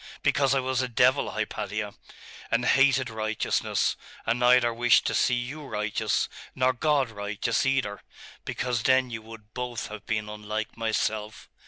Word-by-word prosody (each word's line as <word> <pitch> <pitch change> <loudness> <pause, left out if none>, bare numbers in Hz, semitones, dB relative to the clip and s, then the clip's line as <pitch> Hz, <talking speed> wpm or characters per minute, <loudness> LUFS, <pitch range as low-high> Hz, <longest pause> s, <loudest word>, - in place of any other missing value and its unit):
Because 135 -1 +3
I - - +3
was 130 0 0
a 130 - -1
devil, 125 +3 +3
Hypatia; 105 -1 -3 0.6
and 115 +1 +1
hated 135 0 +4
righteousness, 110 -1 0 0.3
and 115 +2 +1
neither 125 -1 +5
wished 120 +1 +4
to - - 0
see 125 - +3
you 125 +6 -4
righteous, 105 -5 -1 0.3
nor 130 0 +3
God 140 -1 +1
righteous 105 +4 -1
either, 130 -7 0 0.4
because 125 -2 -2
then 130 +1 +3
you 115 -1 -5
would 110 -1 -13
both 125 -2 -4
have 105 -1 -9
been 105 -1 -1
unlike 105 +1 -5
myself. 110 -1 -2
115 Hz, 150 wpm, -27 LUFS, 110-130 Hz, 0.6 s, neither